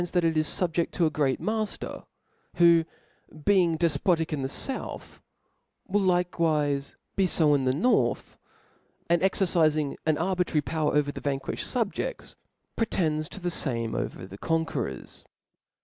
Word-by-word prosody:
^^ 175 - -3
that 175 - +3
they 165 - +2
are - - -5
fubjeft 165 +2 +1
to 170 - +1
a 155 - +1
great 140 -3 0
mailer, 215 -1 -3 0.5
who, 170 -1 +5 0.6
being 180 -5 +4
dcipotic 165 +1 +1
in 145 - -2
the 130 - -1
fouth^ 260 - -5 0.7
will 205 +2 +1
likewife 165 -6 +1 0.2
be 195 -1 +3
(b 165 - +2
in 145 -3 +3
the 130 - +3
north, 180 - +1 0.8
and 170 - +4
exercifing 160 -6 +2
an 155 -1 +3
arbitrary 180 -2 0
power 155 -1 -1
over 145 -1 +2
the. - - -8
Y^nq^J^^^d 135 -1 -2 0.3
fubjefts, 355 - -5 0.4
pretends 160 -8 0
to. 200 - -7
the 175 -1 -2
fame 115 -8 -2
over 90 - -4
the 95 +2 -11
conquerors. 160 - -3
165 Hz, 145 wpm, -27 LUFS, 145-180 Hz, 0.8 s, who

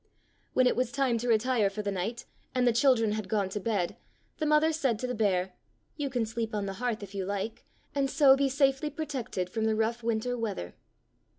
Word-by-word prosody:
When 255 - +4
it 250 - +3
was 250 -1 0
time 260 -4 +1
to 245 - -3
retire 230 -2 +3
for 210 +2 -5
the 200 - -1
night, 200 +6 -3 0.3
and 250 -1 +3
the 240 - +4
children 235 -3 +4
had 210 -2 -3
gone 200 -2 +1
to 210 - -3
bed, 200 -4 -1 0.4
the 310 - 0
mother 305 +1 +4
said 270 -7 +1
to 255 - -4
the 250 - -2
bear, 190 -5 +1 0.4
"You 290 -2 -2
can 245 -3 0
sleep 225 0 -3
on 205 -1 -1
the 195 - -3
hearth, 235 -4 -1
if 200 0 -9
you 195 -1 -2
like, 200 +3 -4 0.3
and 275 -1 +1
so 275 -3 +6
be 275 0 +1
safely 275 +2 +2
protected 275 - -3
from 220 +4 -2
the 220 0 +2
rough 225 +2 0
winter 230 +2 -1
weather." 205 - -4
230 Hz, 215 wpm, -29 LUFS, 210-260 Hz, 0.4 s, so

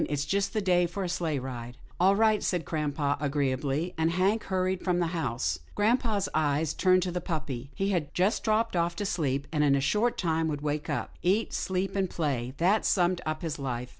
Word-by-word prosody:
It's 145 -1 -1
just 200 +4 0
the 215 - 0
day 180 -2 +3
for 195 +3 -4
a - - -1
sleighride." 130 -8 -3
" - - -27
All 190 +3 +5
right," 215 0 +3
said 175 -5 -1
grampa 145 -2 -1
agreeably, 140 +3 -1
and 160 0 +3
Hank 190 +6 +1
hurried 185 -1 -1
from 180 -2 +1
the 175 - +2
house. 115 - -1 0.2
Grampa's 215 -2 +1
eyes 155 0 +1
turned 185 -1 +3
to 180 - -2
the 180 0 -3
puppy. 150 -7 -4
He 195 +1 0
had 170 -7 -1
just 190 +5 +1
dropped 220 -1 +1
off 170 0 +1
to 205 - -3
sleep, 145 -7 -1
and 150 -2 +1
in 140 -2 +4
a - - +2
short 210 - +1
time 160 -2 0
would 145 -2 -3
wake 150 0 -2
up. - - -3
Eat, 200 +5 +1
sleep 190 +1 -1
and 190 -2 0
play, 135 -7 -2
that 190 +6 +3
summed 180 -1 +2
up 155 +2 -3
his 160 -3 -3
life. 125 -2 -3
170 Hz, 210 wpm, -28 LUFS, 145-190 Hz, 0.2 s, All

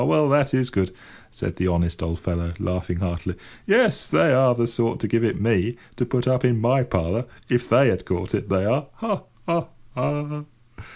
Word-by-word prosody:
Well, 150 +3 +3
that 140 0 +3
is 130 -1 0
good," 95 -4 0 0.4
said - - -5
the 90 - 0
honest 85 -1 0
old 80 +1 -2
fellow, 85 0 -3
laughing 90 0 -3
heartily. 85 -3 -3 0.3
"Yes, - - +3
they 80 +9 +4
are 130 -1 +5
the 120 -1 +1
sort 115 0 -1
to 110 - -1
give 115 +3 +1
it 115 - 0
me, 110 +2 +1 0.2
to 125 0 -1
put 125 0 -1
up 130 0 +2
in 120 -3 +3
my 125 +4 +3
parlour, 95 0 -1 0.2
if 120 0 0
they 125 +2 +6
had 95 - -1
caught 90 0 -3
it, - - -2
they 95 0 +1
are! 135 +6 +1
Ha! 215 -4 -3 0.2
ha! 170 0 0 0.3
ha!" 145 +3 -3
115 Hz, 195 wpm, -23 LUFS, 90-130 Hz, 0.4 s, they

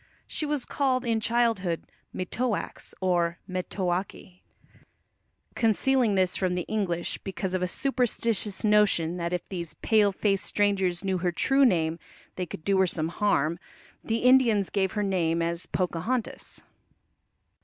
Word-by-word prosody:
She 305 - -3
was 290 -3 -1
called 260 -3 0
in 230 -1 +1
childhood 220 -7 +1 0.3
Metoax, 220 +5 -3
or 175 -2 +1
Metoake. 185 0 -3 1.1
Concealing 235 0 +2
this 185 -1 +2
from 185 -2 0
the 180 - -1
English, 180 -5 -2
because 190 0 -4
of 185 - 0
a 180 - +1
superstitious 230 -4 -1
notion 210 -6 +3
that 170 0 -2
if 180 -1 -3
these 170 -4 -6
pale 210 -2 +4
faced 195 0 0
strangers 195 -3 +1
knew 190 -1 0
her 175 0 0
true 270 +10 +3
name 165 -6 +1 0.4
they 180 -1 -3
could 155 - -8
do 195 +2 +2
her 190 - +4
some 160 -2 -1
harm, 170 -4 +1 0.4
the 230 +1 -1
Indians 245 -6 +4
gave 190 -2 0
her 210 - 0
name 170 -4 +1
as 170 +1 -2
Pocahontas. 190 +7 -2
190 Hz, 140 wpm, -27 LUFS, 175-225 Hz, 1.1 s, pale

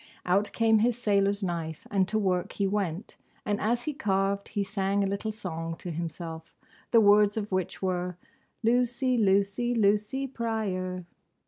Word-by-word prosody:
Out 195 +3 +2
came 225 -1 +3
his 235 +1 +2
sailor's 200 -3 +1
knife, 165 -3 -3
and 195 -2 +2
to 220 - 0
work 185 -4 0
he 200 - 0
went, 195 -1 -2 0.3
and 205 -1 -1
as 240 +3 +1
he 305 - -2
carved 200 -4 0
he 205 -2 -2
sang 195 0 0
a - - +1
little 200 +3 -2
song 165 -6 -5
to 175 - -7
himself, 165 0 -6 0.3
the 230 - +6
words 205 0 +5
of 210 -1 -3
which 185 0 -2
were, 180 -1 -1 0.5
"Lucy, 245 +2 +2
Lucy, 200 +3 +2
Lucy 210 +5 +2
Pryor." 200 -8 -3
200 Hz, 155 wpm, -28 LUFS, 185-220 Hz, 0.5 s, the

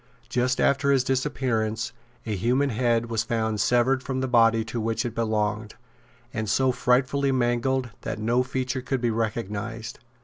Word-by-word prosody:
Just 125 +1 0
after 140 +1 +2
his 135 -2 +3
disappearance, 120 -4 -1 0.3
a 110 -2 -2
human 125 +8 +1
head 115 0 +1
was 115 -2 -1
found 110 -2 -1
severed 125 +4 +3
from 130 -1 -3
the 130 - -1
body 115 -2 +4
to 115 0 -4
which 115 +3 -1
it 120 - -3
belonged, 110 -1 -1 0.6
and 110 -3 -2
so 130 +5 +3
frightfully 130 +3 +2
mangled 125 0 0
that - - -4
no 115 +3 +1
feature 130 0 -2
could 130 +1 -2
be 120 -1 0
recognised. 110 0 -3
120 Hz, 160 wpm, -25 LUFS, 110-130 Hz, 0.6 s, body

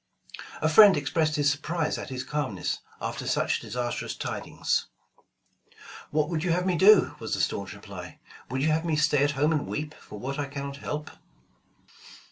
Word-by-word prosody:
A - - +4
friend 195 +4 +8
expressed 155 +2 0
his 145 -2 +3
surprise 155 +2 -2
at - - -7
his 130 -1 -4
calmness, 130 -9 -2 0.2
after - - -4
such - - +1
disastrous 120 0 -3
tidings. - - -2 1.2
*'What 150 0 +1
would 165 -2 -2
you 180 - 0
have 180 +1 0
me 185 -2 +2
do?" 200 +3 +6
was - - -2
the - - -4
staunch - - -1
reply. - - -10 0.3
"Would 130 +2 -1
you 155 - +3
have 155 +1 +1
me 165 -2 0
stay 150 -2 +3
at 145 - +2
home 150 +3 +3
and 150 -2 0
weep, 150 0 -4
for 105 - -12
what 135 +6 -4
I 145 - -1
cannot 140 0 -6
help 150 +1 -5
150 Hz, 175 wpm, -27 LUFS, 140-160 Hz, 1.2 s, friend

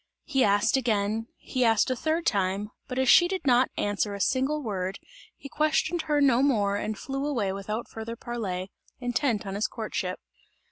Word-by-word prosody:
He 270 -4 +1
asked 205 +4 +3
again, 220 -2 0
he 255 - -2
asked 225 +1 +3
a - - +1
third 320 +5 -1
time, 200 0 0 0.2
but 250 - -5
as 260 0 +2
she 350 +7 +7
did 375 -3 -4
not 255 -1 +4
answer 205 0 -1
a - - -7
single 270 +7 +1
word, 195 -3 -3 0.4
he - - -9
questioned 310 +3 +1
her 295 -1 +3
no 265 -3 +4
more 210 -8 +2
and 215 +1 -3
flew 270 +4 -4
away 235 -10 -1
without 210 +4 -4
further 225 +1 -6
parley, 200 -6 -4 0.3
intent 245 -3 0
on 195 - -4
his 210 +2 0
courtship. 210 -5 -4
230 Hz, 180 wpm, -27 LUFS, 205-270 Hz, 0.4 s, she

